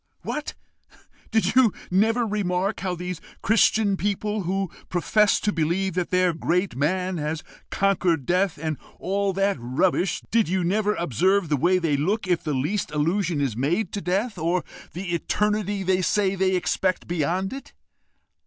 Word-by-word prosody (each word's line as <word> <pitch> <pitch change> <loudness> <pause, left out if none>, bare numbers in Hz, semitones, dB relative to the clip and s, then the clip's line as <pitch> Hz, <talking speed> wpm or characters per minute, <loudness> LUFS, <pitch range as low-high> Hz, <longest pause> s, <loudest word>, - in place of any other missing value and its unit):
"What! 300 - -4 0.7
did 220 -1 +1
you 255 -4 +6 0.2
never 225 +6 +3
remark 195 -1 -1
how 180 0 -2
these 180 -1 -5 0.2
Christian 215 -1 +3
people, 205 +1 -1
who 195 0 -1 0.2
profess 205 +4 +3
to 210 - +1
believe 175 +3 0
that 180 0 -1
their 180 -1 +2
great 180 +4 0
man 180 +6 0
has 155 +1 -3 0.3
conquered 180 -7 +1
death, 180 +2 +1
and 155 -1 -3 0.2
all 200 +1 0
that 195 0 +1
rubbish 160 +9 0
did 225 -5 +3
you 185 0 +1
never 210 +4 +1
observe 175 - +1
the 150 - +3
way 180 +7 +3
they 165 -5 +1
look 200 +9 0
if 175 -2 +1
the 150 -3 -1
least 160 +10 -1
allusion 165 +3 0
is 135 -6 -1
made 155 - 0
to 200 - -4
death, 195 +6 -1
or 170 +3 0 0.3
the 175 0 -4
eternity 205 +2 0
they 185 0 +2
say 195 +2 +1
they 190 -1 +1
expect 185 +1 0
beyond 175 - -1
it? 270 - -9
185 Hz, 160 wpm, -24 LUFS, 170-200 Hz, 0.7 s, you